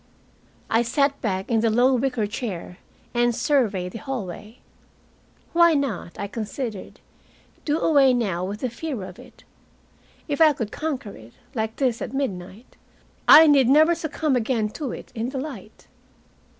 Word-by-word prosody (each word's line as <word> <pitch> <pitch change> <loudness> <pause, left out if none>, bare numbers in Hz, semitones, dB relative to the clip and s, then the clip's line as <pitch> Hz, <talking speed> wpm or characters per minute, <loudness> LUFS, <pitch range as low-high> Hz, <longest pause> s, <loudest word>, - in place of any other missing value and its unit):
I 225 - +2
sat 280 +4 0
back 190 -1 -2
in 225 - +3
the 225 +1 +2
low 245 +4 +3
wicker 250 -3 0
chair 205 -4 -6 0.3
and 240 -1 +2
surveyed 215 - 0
the 225 - -7
hallway. 225 -4 -6 1.0
Why 340 -1 +5
not, 250 -12 -3
I - - -2
considered, 215 +1 -6 0.7
do 300 0 +1
away 285 -5 +4
now 200 -8 -1
with 200 +3 -5
the 255 - -1
fear 265 -5 -5
of 185 -1 -10
it? - - -16 0.8
If 290 0 -2
I 310 -2 +7
could 225 -6 -5
conquer 280 -9 -4
it 110 +1 -15 0.2
like 220 -3 -3
this 250 -4 0
at 255 - -5
midnight, 205 -3 -5 0.5
I 320 - +10
need 275 -5 +5
never 310 +5 +6
succumb 315 -3 -1
again 225 -2 0
to 265 +4 -5
it - - -9
in 230 0 -3
the 270 - -5
light. 255 -7 -8
240 Hz, 155 wpm, -23 LUFS, 210-280 Hz, 1.0 s, I